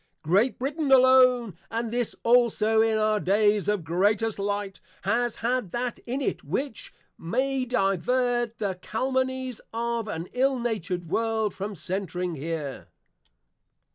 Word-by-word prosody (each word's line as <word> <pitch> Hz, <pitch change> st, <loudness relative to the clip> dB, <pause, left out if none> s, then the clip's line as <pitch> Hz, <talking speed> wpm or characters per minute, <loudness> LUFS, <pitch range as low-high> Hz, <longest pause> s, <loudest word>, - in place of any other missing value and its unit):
Great 195 Hz, -, +2 dB
Brittain 280 Hz, +2 st, -2 dB
alone, 255 Hz, -5 st, +5 dB
and 230 Hz, 0 st, -3 dB
this 240 Hz, -2 st, 0 dB
also 230 Hz, -2 st, +4 dB
in 225 Hz, -1 st, +2 dB
our 215 Hz, 0 st, +2 dB
days 205 Hz, +1 st, +2 dB
of 205 Hz, -4 st, 0 dB
Greatest 205 Hz, +7 st, +1 dB
Light, 200 Hz, -1 st, -3 dB, 0.2 s
has 240 Hz, 0 st, 0 dB
had 250 Hz, -4 st, 0 dB
that 240 Hz, +4 st, -3 dB
in 260 Hz, +4 st, -2 dB
it, -, -, -2 dB
which 270 Hz, -5 st, -4 dB, 0.3 s
may 260 Hz, +8 st, -1 dB
divert 240 Hz, +2 st, 0 dB
the 195 Hz, -4 st, -3 dB
Calumnies 260 Hz, +1 st, -2 dB
of 235 Hz, 0 st, -2 dB
an 170 Hz, -4 st, -4 dB
ill 265 Hz, +1 st, +2 dB
natured 185 Hz, -7 st, -3 dB
World, 220 Hz, +2 st, 0 dB
from 200 Hz, +1 st, -5 dB
centring 180 Hz, 0 st, -3 dB
here. 150 Hz, -2 st, -5 dB
225 Hz, 130 wpm, -26 LUFS, 195-250 Hz, 0.3 s, alone